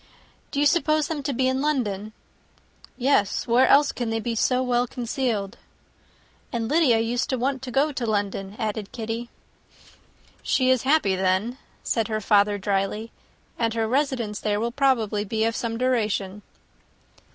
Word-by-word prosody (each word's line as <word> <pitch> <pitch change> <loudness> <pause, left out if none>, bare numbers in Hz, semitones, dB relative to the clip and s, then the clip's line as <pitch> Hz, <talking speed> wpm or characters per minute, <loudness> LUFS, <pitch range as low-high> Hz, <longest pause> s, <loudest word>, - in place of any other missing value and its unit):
"Do 280 - -3
you 290 - +3
suppose 310 -2 +2
them 315 -3 -3
to 280 - -2
be 260 0 +1
in 260 +1 0
London?" 220 -9 -1 0.9
"Yes; 250 -6 +1
where 245 +2 +4
else 285 +1 +5
can 240 -2 -3
they 225 0 -1
be 235 +1 -3
so 250 +3 +1
well 245 -1 +1
concealed?" 235 -5 -3 0.9
"And 230 -3 -2
Lydia 295 -5 +4
used 235 +2 -1
to 260 - 0
want 265 +2 -1
to 265 - -6
go 275 +5 +2
to 255 -4 -3
London," 200 -2 -2
added 215 -3 -3
Kitty. 230 0 -5 1.1
"She 260 -1 +2
is 255 -2 +3
happy, 265 -9 +2
then," 190 +7 0 0.2
said 225 -3 0
her 215 -1 -2
father, 205 -1 +3
drily; 200 +3 -2 0.5
"and 230 -1 0
her 225 -1 0
residence 245 -5 -1
there 210 -1 -1
will 235 +2 -1
probably 235 -6 +1
be 220 +1 -1
of 230 0 0
some 230 -1 -3
duration." 210 -5 -1
235 Hz, 160 wpm, -24 LUFS, 210-260 Hz, 1.1 s, else